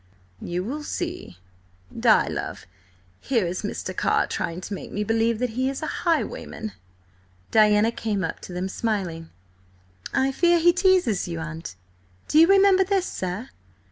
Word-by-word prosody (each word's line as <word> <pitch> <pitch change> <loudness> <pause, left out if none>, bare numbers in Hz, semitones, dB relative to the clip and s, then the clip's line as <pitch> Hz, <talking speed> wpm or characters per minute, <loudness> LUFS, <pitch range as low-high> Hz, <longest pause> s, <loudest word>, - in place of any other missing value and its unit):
"You 175 +1 -3
will 280 +9 -4
see. 345 - -5 0.6
Di, - - +4
love, - - -5 0.5
here 235 -7 0
is 175 +2 -3
Mr. 195 -3 -4
Carr - - +2
trying 170 +1 -3
to 200 - -6
make 195 - -7
me 210 - -2
believe 225 +1 +1
that 250 0 -1
he 255 +3 0
is 275 +3 -5
a - - -4
highwayman!" 325 - -2 0.8
Diana 215 0 +5
came 210 -4 -2
up 165 - -3
to - - -10
them 180 +1 -3
smiling. 185 -6 -3 0.8
"I 265 +1 +1
fear 345 +5 +3
he 345 +1 +5
teases 365 - +2
you, 170 -1 -4
aunt. 160 - -7 0.5
Do 305 - +4
you 330 - +8
remember 390 0 +5
this, 380 -1 0
sir?" 185 - -4
225 Hz, 155 wpm, -24 LUFS, -, 0.8 s, you